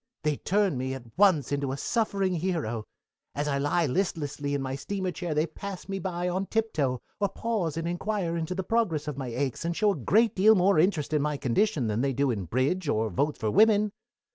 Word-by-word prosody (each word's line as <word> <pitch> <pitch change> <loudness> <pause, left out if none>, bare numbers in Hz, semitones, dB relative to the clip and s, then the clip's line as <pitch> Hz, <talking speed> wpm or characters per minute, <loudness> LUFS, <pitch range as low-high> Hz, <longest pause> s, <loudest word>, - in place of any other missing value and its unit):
"They 150 -2 +1
turn 195 -8 +1
me 130 +1 -2
at 120 -3 -12
once 180 -9 +4
into 140 -2 -1
a 135 - -3
suffering 195 - 0
hero. 160 - -2 0.5
As 145 +1 -1
I 140 -1 0
lie 145 +4 +1
listlessly 145 -3 -1
in 140 - -1
my 130 0 -3
steamer 185 +7 -3
chair 175 -3 -4
they 155 +1 +2
pass 190 +3 -8
me 195 0 -3
by 180 -1 -2
on 185 +2 -1
tip 225 0 -1
toe, 130 -5 0 0.2
or 200 -1 +1
pause 195 -7 -2
and 165 0 -2
inquire 175 0 -2
into 170 +2 -2
the 190 - -2
progress 180 -8 0
of 150 - -3
my 130 - -4
aches 130 +3 -2
and 170 0 -1
show 210 -1 +3
a - - -2
great 215 - +2
deal 215 +3 +6
more 185 -2 +4
interest 160 -4 +1
in 150 - +3
my 150 0 -1
condition 140 - +1
than 110 +1 0
they 135 0 +1
do 140 +1 +1
in 100 -5 -3
bridge 140 - 0
or 110 -3 0
votes 145 - 0
for 110 -3 -1
women. 210 - +4
160 Hz, 220 wpm, -27 LUFS, 140-195 Hz, 0.5 s, deal